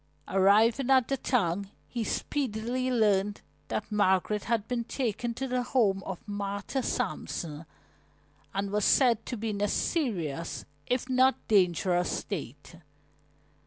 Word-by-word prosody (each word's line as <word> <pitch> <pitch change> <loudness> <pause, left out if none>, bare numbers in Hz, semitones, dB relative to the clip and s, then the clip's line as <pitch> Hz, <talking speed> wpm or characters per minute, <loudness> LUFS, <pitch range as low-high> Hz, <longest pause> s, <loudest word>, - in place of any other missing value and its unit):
Arriving 220 +7 +4
at 260 -3 +5
the 275 - +2
town, 200 -6 0 0.2
he 235 -2 -3
speedily 250 0 -2
learned 210 -4 +2 0.3
that 215 - -3
Margaret 205 0 +2
had 220 -2 0
been 245 -2 -1
taken 235 -1 -2
to 265 +2 -3
the 250 0 0
home 225 -6 +2
of 190 +2 -6
Martha 205 +5 -3
Sampson 170 - -3 0.8
and 195 0 -2
was 210 0 0
said 240 -2 +4
to 245 - -3
be 220 +1 -2
in 200 -1 -4
a 205 - +3
serious 175 - -2 0.2
if 250 0 0
not 260 0 +4
dangerous 180 -3 +3
state. - - -6
215 Hz, 130 wpm, -29 LUFS, 195-250 Hz, 0.8 s, at